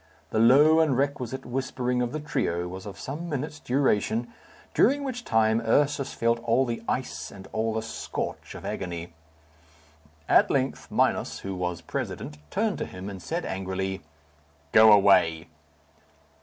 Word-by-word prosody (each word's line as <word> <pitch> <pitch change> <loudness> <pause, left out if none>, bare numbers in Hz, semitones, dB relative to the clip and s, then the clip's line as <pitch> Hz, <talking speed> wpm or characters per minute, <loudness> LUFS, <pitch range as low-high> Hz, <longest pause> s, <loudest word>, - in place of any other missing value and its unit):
The 110 - +1
low 145 +8 +6
and 150 -6 +3
requisite 135 -2 -2
whispering 125 0 -2
of 120 -1 -1
the 155 - -3
trio 90 - -1
was 95 +2 -8
of 100 - -8
some 160 +6 -5
minutes' 150 +1 -4
duration, 120 -3 0 0.4
during 280 +4 +3
which 250 -3 -4
time 110 - +2
Ursus 140 +4 +1
felt 115 0 +1
all 115 +3 +2
the 120 -2 -3
ice 130 - -3
and 95 -1 -12
all 110 0 -1
the 110 - -1
scorch 110 - -5
of - - -9
agony. 85 -2 -5 1.1
At - - +5
length 135 -1 -1
Minos, - - 0
who 95 - -4
was 90 -2 -3
president, 75 0 -5
turned - - -1
to - - -2
him 95 +2 -7
and 95 -2 -8
said 165 - -3
angrily, 95 0 -3 0.7
"Go 110 0 +8
away!" 95 -5 +4
115 Hz, 150 wpm, -26 LUFS, 95-140 Hz, 1.1 s, Go